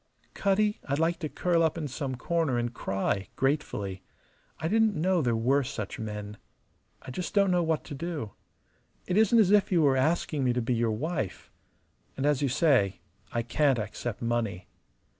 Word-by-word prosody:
"Cutty, 210 +1 +1
I'd 140 - +1
like 165 +2 +1
to 155 -4 -3
curl 175 +1 +1
up 160 0 +1
in 155 -3 -3
some 130 -1 -4
corner 160 -1 0
and 120 0 -2
cry, 95 -1 -2
gratefully. 105 -9 -1 0.6
I 160 - -1
didn't 220 +2 +3
know 180 +1 +2
there 120 -5 +1
were 130 +5 +2
such 115 -6 -5
men. 105 -1 -6 0.7
I - - -8
just 180 +9 -5
don't 200 -2 +4
know 180 -1 +3
what 160 -2 0
to 150 - -8
do. 150 -7 -4 0.7
It 180 - -1
isn't 220 +2 +5
as 205 -4 +5
if 205 -1 +4
you 170 -3 +4
were 140 -2 +4
asking 150 +1 +1
me 125 -1 +2
to 125 - 0
be 125 - 0
your 115 -1 +1
wife. 115 - -3 0.7
And 135 - -1
as 145 -2 +2
you 140 - +1
say, 130 - +2 0.3
I 115 - -1
can't 135 +2 +2
accept 110 +1 -4
money. 115 -6 -1
140 Hz, 180 wpm, -28 LUFS, 115-170 Hz, 0.7 s, isn't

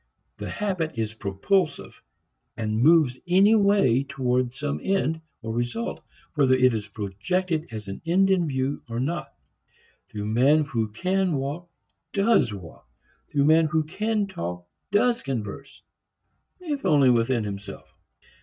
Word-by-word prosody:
The - - -5
habit 180 - -2
is 110 -1 -2
propulsive 130 - -1 0.6
and 110 0 -1
moves 150 -4 +4
anyway 200 - +4
toward 130 -3 -1
some 140 +2 -3
end, 175 -5 0 0.2
or 110 0 -4
result, 120 - -3 0.3
whether 135 -4 +4
it 130 -1 +4
is 105 -2 -3
projected 135 - -2
as 110 -3 -7
an 100 - -7
end 190 +4 +3
in 180 -3 +2
view 135 0 -2
or 115 +1 -3
not. 160 +7 -3 0.8
The 105 -1 -5
man 130 +8 +3
who 115 -6 -1
can 185 - 0
walk 145 +6 -4 0.4
does 200 - +3
walk; 85 -9 -10 0.4
the 140 -1 +2
man 160 +2 +5
who 160 0 +1
can 210 +6 -1
talk 90 - -6 0.2
does 235 +4 +2
converse 135 +1 -6 0.8
if 300 -6 -4
only 140 -4 +5
with 115 -1 +2
himself. 100 -9 -4
140 Hz, 135 wpm, -25 LUFS, 115-180 Hz, 0.8 s, man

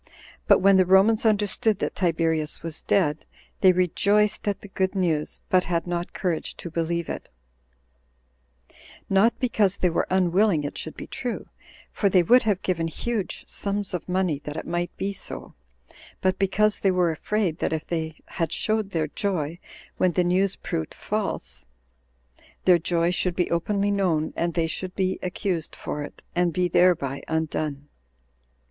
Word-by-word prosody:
But - - +6
when 195 0 +6
the 185 - +5
Romans 210 +4 +5
understood 210 +1 +1
that - - -2
Tiberius 160 -4 +1
was 165 -2 -5
dead, 155 -6 +1 0.4
they 185 - +7
rejoiced 200 +4 +2
at 200 -1 -1
the - - -10
good 190 0 -1
news, 165 -5 -1
but 185 -1 +3
had 170 -1 -1
not 175 0 -3
courage 175 -4 -3
to 170 - -7
believe 170 0 -1
it; - - -6 1.8
not 200 +5 +4
because 210 -6 +1
they 180 - +2
were - - 0
unwilling 185 -2 +3
it 145 - -4
should 160 - -6
be - - -6
true, 245 -2 -5 0.4
for 200 - +1
they 185 -2 +4
would 250 +9 +6
have 205 -5 0
given 170 -3 0
huge 215 +5 -4
sums 200 -1 -2
of 180 0 -4
money 180 -5 +1
that 150 +1 -7
it - - -5
might 175 0 -1
be 200 +1 -2
so, - - -7 0.7
but 185 0 0
because 205 +2 +2
they 195 - +2
were 180 -2 +2
afraid, 180 +1 -1
that - - 0
if 160 -1 -2
they 160 -2 -3
had 165 -2 -3
showed 215 -2 0
their 160 -5 -1
joy 170 -2 -2 0.4
when 185 -1 +2
the 180 - +2
news 185 +2 +2
proved 80 - -4
false, - - -3 1.0
their 180 -2 +6
joy 170 +1 +1
should 180 -1 0
be 180 - 0
openly 200 +4 +1
known, 175 -6 +1
and 170 0 -1
they 165 -2 +2
should 180 +3 -4
be 190 -1 0
accused 180 -2 -3
for 150 - -5
it, 145 - -9
and 175 -1 +2
be 180 +2 +1
thereby 165 -6 +2
undone. 155 -2 -2
180 Hz, 165 wpm, -25 LUFS, 165-195 Hz, 1.8 s, they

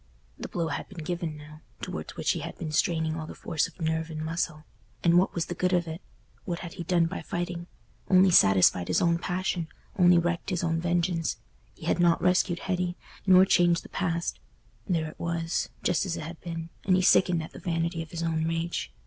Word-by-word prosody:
The - - -5
blow 165 -2 -2
had 145 - -4
been 175 -5 -8
given 170 -2 -3
now, 155 +1 -12 0.2
towards - - -6
which - - +1
he - - -2
had - - -7
been 155 - -5
straining 160 0 +1
all 160 -1 -5
the - - -8
force 155 - -1
of - - -18
nerve 160 0 -1
and 155 -1 -5
muscle—and 165 +1 -1
what 185 - 0
was 170 -1 0
the - - -4
good 180 +1 0
of 175 -1 +2
it? 160 +3 -6 0.4
What 175 -3 -4
had 170 -2 -7
he 170 - -6
done 170 -1 +2
by 170 +3 -4
fighting? 175 0 -4 0.4
Only 185 0 +6
satisfied 95 - +5
his - - +2
own 170 0 +2
passion, 180 -2 -2 0.3
only 180 -1 +7
wreaked 170 0 0
his 180 -2 -1
own 165 -1 0
vengeance. 175 -1 0 0.4
He - - -11
had - - +1
not 170 -1 +4
rescued 180 -1 +2
Hetty, 180 -2 -1 0.3
nor 185 0 +8
changed 175 -3 +3
the - - -12
past—there 165 - -3
it 155 - -9
was, 170 0 -1
just 175 -3 +2
as 175 -1 -2
it - - -5
had 165 +2 -8
been, 165 -1 -5
and 185 - +3
he 185 - +2
sickened 175 -2 +4
at 160 - -9
the - - -10
vanity 165 -1 -1
of 165 - -8
his 170 0 -4
own 160 -1 0
rage. 165 - -2
170 Hz, 210 wpm, -28 LUFS, 160-175 Hz, 0.4 s, nor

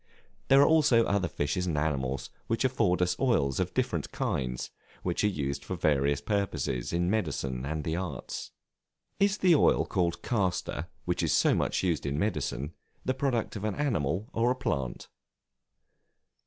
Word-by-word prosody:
There 135 - +6
are - - +5
also 145 -8 +5
other 100 -2 +1
fishes 85 +4 -1
and 80 -4 -1
animals 70 -3 -1 0.2
which 115 +3 0
afford 105 -9 +2
us 90 0 +1
oils 70 - +2
of - - -2
different - - -1
kinds, 60 -1 -2 0.3
which 90 +1 -1
are - - +5
used 70 -7 -2
for 95 - -4
various 70 -3 +2
purposes 85 - -1
in 85 +1 +1
medicine 70 - -1
and 80 0 -2
the 80 +1 -1
arts. 90 -8 -5 0.7
Is 200 +1 +3
the 185 -3 +5
oil 150 - +4
called 85 -3 -1
castor, 90 - -1 0.2
which - - 0
is - - +1
so - - +4
much - - 0
used 85 -5 0
in 70 +1 -1
medicine, 75 - -2 0.3
the 130 - +1
product 130 -5 -1
of 105 - -5
an 105 -2 -1
animal 100 - 0
or 115 +2 +2
a 125 - +2
plant? 70 - -3
90 Hz, 165 wpm, -29 LUFS, 70-115 Hz, 0.7 s, There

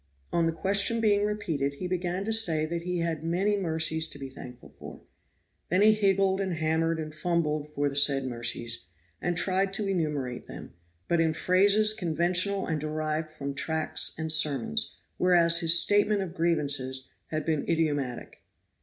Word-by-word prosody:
On 170 -1 +2
the - - +1
question 200 +6 +2
being 205 -2 +2
repeated, 165 -10 -2
he 180 - -7
began 180 +1 -3
to 225 - 0
say 165 -9 +4
that 170 +1 -4
he 180 0 -3
had 165 -2 -3
many 185 +5 0
mercies 160 -3 +2
to - - -8
be 135 -1 -8
thankful 125 -1 -12
for. - - -11 0.7
Then 185 +4 +2
he 215 0 +6
higgled 195 -2 +1
and 190 -3 -2
hammered 160 +1 0
and 155 -1 -6
fumbled 155 -2 -2
for 145 -1 -1
the 140 - -4
said 140 -1 +3
mercies, 120 -4 -2 0.3
and 175 -1 -2
tried 190 +1 0
to 205 +1 +1
enumerate 150 -9 -3
them, - - -10 0.3
but 170 -1 +1
in 160 -1 +1
phrases 205 +5 +3
conventional 180 +1 0
and 155 -3 -3
derived 155 +1 -3
from 140 -2 -6
tracts 160 +3 -1
and 160 0 -3
sermons; 135 - +2 0.2
whereas 170 -2 +4
his 170 -1 +4
statement 205 +2 +2
of 175 -3 -8
grievances 145 -6 0 0.2
had 155 -1 -4
been 155 -3 0
idiomatic. 145 -7 -2
165 Hz, 165 wpm, -27 LUFS, 150-190 Hz, 0.7 s, he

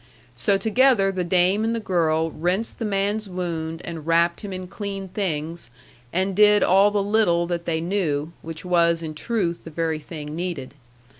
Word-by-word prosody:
So 125 +12 +2
together 220 -2 +3
the 185 -1 -2
dame 185 +4 +2
and 225 +1 0
the - - -1
girl 165 -5 +1
rinsed 180 +9 -1
the 230 - -2
man's 205 +1 -1
wound 165 -3 -4
and 165 -2 -7
wrapped 170 +1 +2
him 205 - -6
in 185 0 -5
clean 195 0 -6
things, 165 - -3 0.4
and 190 +1 0
did 210 0 +6
all 195 +3 +5
the 205 -1 0
little 195 -5 +2
that 170 -1 -3
they 160 -1 -1
knew 165 -4 -1
which 165 +1 -8
was, 170 -2 +2
in 155 -1 -5
truth, 175 0 -2
the - - -8
very 160 0 -2
thing 150 -1 -8
needed. 170 -7 -4
180 Hz, 175 wpm, -23 LUFS, 165-200 Hz, 0.4 s, did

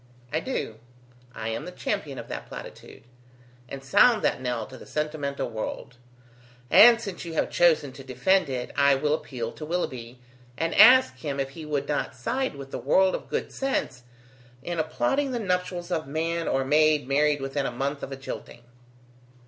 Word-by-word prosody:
"I 155 - +2
do; 160 - -4 0.6
I 110 0 -4
am 115 +7 -4
the 180 - -7
champion 180 -7 -3
of - - -7
that - - -6
platitude, - - -10 0.7
and 135 -1 -7
sound 215 - +4
that - - +1
knell 120 -3 -2
to 130 - -12
the - - -12
sentimental 150 -2 -3
world; 115 +2 -6 0.7
and 235 +1 +8
since 200 -6 -6
you 170 -2 -7
have - - 0
chosen 155 -5 +3
to 135 - -11
defend 140 +8 +1
it, 125 -2 -4
I 140 -1 +5
will 150 +2 0
appeal 120 -6 -4
to - - -10
Willoughby, 130 -8 -4 0.4
and 165 +1 -1
ask 250 - +7
him 140 0 -4
if 135 0 -2
he 155 +2 -9
would 145 -2 -2
not 145 -3 -2
side 250 - -2
with 135 -1 -9
the - - -4
world 185 +9 +3
of - - -5
good - - -3
sense 260 - -2 0.6
in 175 -1 -3
applauding 160 - 0
the 240 - -1
nuptials 180 -3 -2
of 160 -4 -1
man 165 +3 -2
or 135 0 0
maid 150 0 +3
married 145 +1 +2
within 135 +1 -2
a - - -3
month 140 +4 -3
of 135 - -6
a - - -4
jilting?" 130 -2 -8
150 Hz, 180 wpm, -26 LUFS, 135-175 Hz, 0.7 s, and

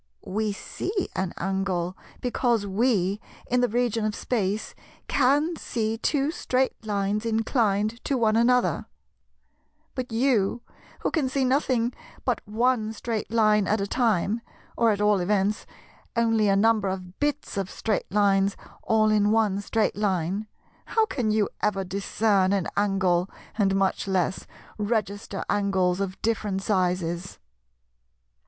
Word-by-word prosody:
We 215 +2 -1
see 385 - -3
an 185 -2 -1
angle, 185 -1 -1 0.3
because 240 -3 +1
we, 200 -1 +1 0.2
in 250 0 +1
the 245 - +3
region 235 -1 0
of 215 -1 -1
Space, 210 -3 -2 0.3
can 290 +5 +2
see 220 -5 -2
two 285 +3 +1
straight 260 -5 0
lines 205 0 -1
inclined 225 -1 0
to 275 - +1
one 220 -2 +2
another; 245 +2 +2 1.1
but 250 -3 -4
you, 230 -2 +1 0.4
who - - 0
can 285 -5 +1
see 270 0 +1
nothing 255 -3 +1 0.3
but 250 -3 0
on 225 -1 +1
straight 225 0 -3
line 215 -2 +3
at 215 - +2
a 200 - 0
time, 220 -1 +1 0.3
or 230 -1 +3
at 205 -1 +1
all 210 -1 +4
events 200 +3 0 0.5
only 225 -2 +3
a 195 - +4
number 215 0 +3
of 185 -1 -5
bits 295 0 -1
of 195 -2 -2
straight 215 -2 -2
lines 200 -1 +3 0.2
all 215 -1 +3
in 210 -1 +3
one 210 -3 +2
straight 220 +2 0
line,—how 205 - -2
can 250 - -2
you 215 -1 +2
ever 195 -2 +1
discern 195 +1 +1
an 195 -4 0
angle, 190 -3 +2 0.3
and 195 -3 +2
much 195 0 0
less 190 -1 0 0.3
register 205 -2 -2
angles 190 -3 +1
of 195 -1 -3
different 205 -3 -1
sizes?" 180 -3 -1
210 Hz, 135 wpm, -26 LUFS, 195-235 Hz, 1.1 s, all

